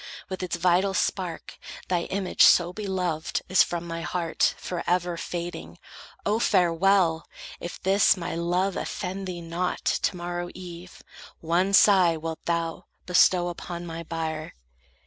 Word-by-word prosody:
With 190 -1 -5
its 180 -2 -2
vital 180 +3 +2
spark 180 -4 -2 0.3
Thy 175 -2 0
image 190 -1 -2
so 175 0 +6
beloved 180 -6 -2
is 185 - +5
from 170 -1 0
my 165 0 -5
heart 170 -1 0
Forever 175 0 -1
fading. 175 +1 -6 0.5
Oh, 215 +2 +1
farewell! 180 -3 +3 0.3
If 175 - -7
this, 195 +1 +4
My 170 - -4
love 175 +3 0
offend 190 +1 -4
thee 175 -2 -5
not, 170 +2 -3
to 180 - 0
morrow 175 0 -4
eve 180 0 -10 0.4
One 175 +4 +1
sigh 185 -4 +5
wilt 160 0 -6
thou 170 -1 -2 0.2
bestow 180 0 +4
upon 175 0 -6
my 165 0 -6
bier." 160 -1 -4
175 Hz, 135 wpm, -26 LUFS, 170-185 Hz, 0.5 s, so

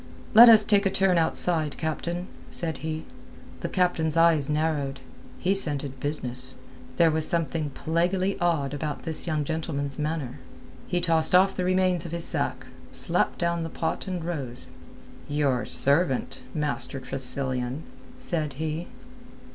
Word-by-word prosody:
"Let 235 +2 +10
us 215 -2 +8
take 200 -2 +3
a - - +2
turn 190 -2 +2
outside, 160 -2 +1
captain," 170 +3 -3 0.2
said 165 -2 0
he. 160 0 -5 0.5
The - - -4
captain's 165 -3 0
eyes 165 -4 +4
narrowed. 150 -3 -1 0.4
He 190 - +1
scented 145 -8 0
business. 130 -3 -1 0.4
There 165 -2 +5
was 155 0 -1
something 165 -3 -1
plaguily 180 +7 -1
odd 160 -6 0
about 150 +1 -4
this 160 +1 -4
young 155 -2 0
gentleman's 145 -2 -4
manner. 150 -4 -3 0.5
He 175 - -1
tossed 165 -1 +2
off 190 +1 +4
the 180 - -2
remains 185 -2 +1
of 170 - -8
his 170 -1 -3
sack, - - -3 0.2
slapped - - +1
down 170 0 -1
the 165 - -4
pot 160 +3 -3
and 180 -3 -4
rose. 135 -8 -5 0.6
"Your 145 -4 0
servant, 140 -1 +4
Master 140 -3 -2
Tressilian," 130 +1 -4 0.3
said 155 -4 -3
he. 155 +4 -4
160 Hz, 140 wpm, -26 LUFS, 145-175 Hz, 0.6 s, Let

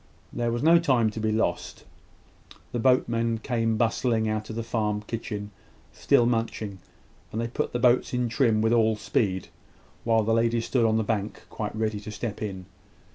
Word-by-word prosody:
There 120 -1 -1
was 120 +3 -2
no 165 +2 +6
time 125 -9 +2
to 110 - -6
be 110 0 0
lost. 110 -5 -2 0.9
The 120 - -2
boatmen 115 -2 +2
came 115 -1 -1
bustling 115 0 +1
out 110 0 -2
of 110 - -5
the 115 - -3
farm 105 -2 -1
kitchen, 105 -2 -5 0.4
still 120 - +3
munching; 115 -4 -2 0.5
and 110 - -3
they 115 - -1
put 120 - -3
the - - -1
boats 120 +1 +3
in 125 -1 0
trim 115 -3 +2
with 115 +1 +3
all 110 -2 +3
speed, 95 -3 -1 0.5
while 115 -1 +3
the 115 +2 +1
ladies 115 0 +1
stood 120 -3 +1
on 110 0 +3
the 110 - +1
bank 105 -1 -3
quite 105 -1 -4
ready 110 -1 -1
to 105 - -9
step 105 0 -5
in. 95 -4 -5
115 Hz, 185 wpm, -26 LUFS, 110-120 Hz, 0.9 s, no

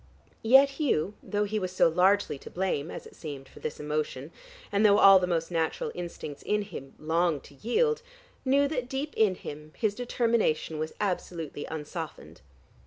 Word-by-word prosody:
Yet 265 +5 +7
Hugh, 205 - +1
though 205 0 -1
he 210 +1 -1
was 185 -2 -3
so 185 - +4
largely 180 -2 +3
to - - -10
blame, 175 -5 -1
as - - -7
it - - -14
seemed, 140 -4 -7
for - - -15
this 155 - -5
emotion, 150 -1 -3 0.4
and 200 +1 +2
though 205 -1 +6
all 195 -2 +9
the 180 - -1
most 165 -1 -1
natural 165 -2 -1
instincts 170 -4 -7
in 210 0 0
him 135 -9 -9
longed 160 -2 0
to - - -15
yield, 450 - +1 0.4
knew 280 +2 +3
that 250 -4 -3
deep 275 +3 -3
in 210 -4 +3
him 150 -1 -9
his 215 -3 +1
determination 230 -9 0
was 155 0 -4
absolutely 170 -6 -3
unsoftened. 160 +1 -7
180 Hz, 175 wpm, -28 LUFS, 155-215 Hz, 0.4 s, all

